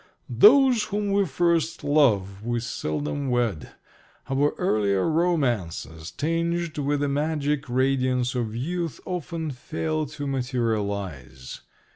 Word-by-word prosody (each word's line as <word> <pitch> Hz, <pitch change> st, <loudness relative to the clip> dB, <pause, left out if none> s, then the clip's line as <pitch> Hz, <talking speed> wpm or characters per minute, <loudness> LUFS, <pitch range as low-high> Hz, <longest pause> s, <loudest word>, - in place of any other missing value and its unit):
"Those 255 Hz, -1 st, +7 dB
whom 205 Hz, -1 st, -2 dB
we 200 Hz, -1 st, +2 dB
first 170 Hz, +2 st, 0 dB
love 105 Hz, -10 st, +2 dB
we 120 Hz, +1 st, -1 dB
seldom 75 Hz, -, -3 dB
wed. 120 Hz, -, -1 dB, 0.6 s
Our 145 Hz, +2 st, +2 dB
earlier 100 Hz, -, +1 dB
romances, 120 Hz, -, -1 dB
tinged 165 Hz, +1 st, -1 dB
with 145 Hz, 0 st, 0 dB
the 145 Hz, -, +1 dB
magic 145 Hz, -1 st, -1 dB
radiance 130 Hz, -1 st, +1 dB
of 115 Hz, -3 st, -2 dB
youth, 170 Hz, +5 st, -3 dB
often 170 Hz, -3 st, -4 dB
fail 155 Hz, +4 st, -3 dB
to 145 Hz, +1 st, -6 dB
materialize." 100 Hz, -, -3 dB
140 Hz, 110 wpm, -25 LUFS, 115-165 Hz, 0.6 s, Those